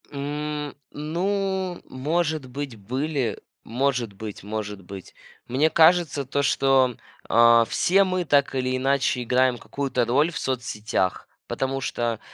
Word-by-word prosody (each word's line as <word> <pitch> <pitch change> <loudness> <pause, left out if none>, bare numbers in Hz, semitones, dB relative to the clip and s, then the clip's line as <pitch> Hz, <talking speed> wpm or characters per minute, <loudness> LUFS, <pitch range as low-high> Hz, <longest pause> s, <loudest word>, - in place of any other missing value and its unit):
М, 150 +1 -4 0.2
ну, 185 +4 -2
может 155 +1 -1
быть 135 -1 -6
были, 130 +3 -2 0.2
может 125 -3 -1
быть, 105 0 -8
может 105 -1 -5
быть. 95 +1 -10 0.3
Мне 140 +6 +2
кажется, 160 -3 +4
то, 140 +2 -1
что, 135 -2 +3 0.3
а, 115 0 +6
все 195 - +3
мы 185 -2 -1
так 140 -2 +2
или 130 0 0
иначе 130 -1 +1
играем 125 +1 +2
какую-то 130 -1 -2
роль 145 +8 +2
в 155 - -5
соцсетях, 110 -6 -2 0.2
потому 135 0 -2
что, 120 -3 -2
135 Hz, 125 wpm, -24 LUFS, 120-150 Hz, 0.3 s, а